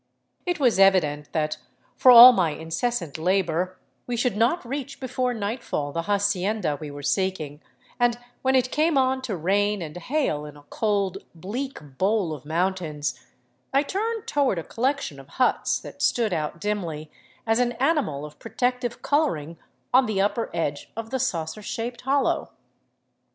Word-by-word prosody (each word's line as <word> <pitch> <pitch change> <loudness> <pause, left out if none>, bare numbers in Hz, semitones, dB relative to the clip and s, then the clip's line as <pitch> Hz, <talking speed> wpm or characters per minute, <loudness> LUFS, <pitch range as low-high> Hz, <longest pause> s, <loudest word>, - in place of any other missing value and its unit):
It 355 -3 0
was 245 -8 +3
evident 155 -7 +3
that, 155 -1 -1 0.4
for 255 - +5
all 245 +1 +12
my 175 -8 +1
incessant 165 - -3
labor, 185 0 0 0.3
we 245 -1 -2
should 245 -2 +1
not 240 +9 +1
reach 275 +2 -5
before 255 -1 -1
nightfall 210 - -3
the 165 - -2
hacienda 205 -2 0
we 150 - -5
were 145 0 -9
seeking, 160 -4 -1 0.4
and 240 -1 +3 0.2
when 265 0 +2
it 255 -1 +2
came 310 0 +2
on 260 0 +2
to 225 -8 -3
rain 205 +5 +1
and 155 -2 -8
hail 180 - -1
in 150 -1 -10
a 145 - -16
cold, 200 -4 0 0.2
bleak 190 - -6
bowl 195 -4 +1
of 145 -2 -9
mountains, 155 -6 -2 0.5
I 275 +1 +3
turned 440 +7 -2
toward 275 -9 +1
a 165 - -3
collection 255 - -2
of 135 - -13
huts 255 - +2
that - - -10
stood 225 -5 +2
out 155 +1 -3
dimly 170 -7 -3 0.3
as 225 +1 +2
an 245 -1 +1
animal 250 - 0
of 150 0 -12
protective 245 +2 -2
coloring 170 - 0 0.3
on 255 0 +5
the 210 -3 -1
upper 210 +4 0
edge 145 -3 -3
of 225 0 -5
the 260 - -1
saucer 165 -6 -2
shaped 230 +3 -5
hollow. 275 +2 +1
205 Hz, 160 wpm, -25 LUFS, 160-250 Hz, 0.5 s, all